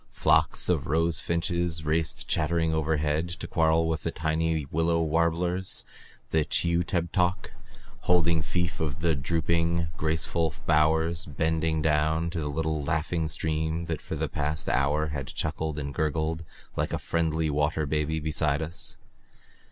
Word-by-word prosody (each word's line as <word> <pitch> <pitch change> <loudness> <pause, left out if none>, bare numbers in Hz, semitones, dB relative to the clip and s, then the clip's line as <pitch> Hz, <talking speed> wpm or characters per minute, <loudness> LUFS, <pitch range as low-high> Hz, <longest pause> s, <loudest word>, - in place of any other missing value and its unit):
Flocks - - +3
of - - +1
rose 80 +2 +2
finches 85 -1 -1
raced 80 +1 0
chattering 80 0 +1
overhead 80 +1 0
to 85 - -6
quarrel 80 0 +2
with 80 -1 -1
the - - -2
tiny 80 -1 0
willow 85 +1 +2
warblers, 85 +3 +1 0.5
the 80 -1 +3
chi 85 +3 +2
u 85 0 +2
teb 85 -1 -1
tok, 90 -1 0 0.6
holding 85 -2 +4
fief 85 +4 -2
of 80 0 -2
the 85 -1 +3
drooping, 85 +3 0
graceful 80 0 0
bowers 80 +2 +2
bending 80 +1 0
down 80 +2 +1
to 85 - -3
the 75 -2 -2
little 80 0 -1
laughing 80 +2 -1
stream 80 +2 -2
that 80 -2 -3
for - - -5
the - - -1
past 75 0 -2
hour 75 +4 +1
had 70 -2 -4
chuckled 75 +2 -3
and 70 -1 -4
gurgled 80 +2 -1 0.3
like - - -1
a - - +1
friendly 80 -1 0
water 75 +2 +1
baby 75 +2 -1
beside 75 -1 0
us. 80 +3 -4
80 Hz, 150 wpm, -27 LUFS, 75-85 Hz, 0.6 s, holding